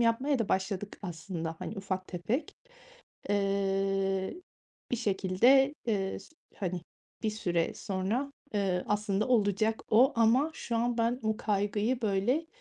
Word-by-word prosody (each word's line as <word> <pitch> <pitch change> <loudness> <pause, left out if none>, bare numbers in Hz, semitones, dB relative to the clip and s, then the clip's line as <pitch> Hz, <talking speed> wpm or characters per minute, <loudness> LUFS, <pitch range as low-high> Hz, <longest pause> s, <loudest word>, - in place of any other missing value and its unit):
yapmaya 255 +5 +2
da 225 -3 -1
başladık 190 +1 -1
aslında, 165 -2 -5
hani, 220 - -6
ufak 190 -1 -3
tefek. 215 - -2 0.8
Eee, 195 - +1 0.6
bir 245 - +1
şekilde, 235 +7 +4
eee, 195 -4 0
s - - -14 0.3
hani, 180 -2 -2 0.4
bir 220 - +1
süre 175 -6 -1
sonra, 210 +9 -2 0.2
eee, 190 -3 +1
aslında 210 +1 0
olacak 220 -1 +2
o 240 +5 +6
ama 235 +7 +4
şu 235 - -3
an 235 +1 0
ben 235 +3 +1
bu 220 0 0
kaygıyı, 210 +4 0
böyle 220 +10 +1
205 Hz, 130 wpm, -30 LUFS, 195-235 Hz, 0.8 s, o